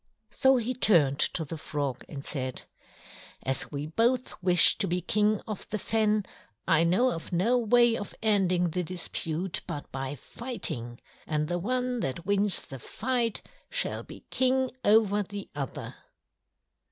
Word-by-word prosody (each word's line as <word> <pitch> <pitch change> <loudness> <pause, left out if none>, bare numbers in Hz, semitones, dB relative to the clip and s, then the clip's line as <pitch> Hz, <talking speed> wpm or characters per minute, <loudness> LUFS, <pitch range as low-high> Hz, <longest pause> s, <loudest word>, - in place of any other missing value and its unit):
So 265 0 +4
he 245 +1 -1
turned 165 - +3
to 160 - 0
the 155 +2 -6
Frog 140 -4 -3
and 140 -2 -7
said: 130 -3 -3 0.8
"As 135 0 +1
we 145 0 -4
both 235 +10 +1
wish 180 -1 +7
to 200 - 0
be 180 +1 0
King 210 +2 +2
of 215 -3 -7
the 215 - -2
Fen 215 -1 +1 0.4
I 165 -2 +5
know 205 +10 +3
of 165 - -6
no 220 +8 +2
way 240 0 +4
of 205 - -6
ending 185 -5 +2
the 180 +2 -1
dispute 170 0 -2
but 145 - -6
by 135 +1 -4
fighting, 125 - -4 0.3
and 150 -1 0
the 175 +1 -1
one 250 +4 -1
that 165 - -3
wins 200 0 +1
the 135 - -9
fight 235 - -2 0.3
shall - - -1
be - - -12
King 260 0 +2
over 210 -1 +4
the 200 0 -7
other." 140 -3 -5
190 Hz, 150 wpm, -28 LUFS, 155-230 Hz, 0.8 s, wish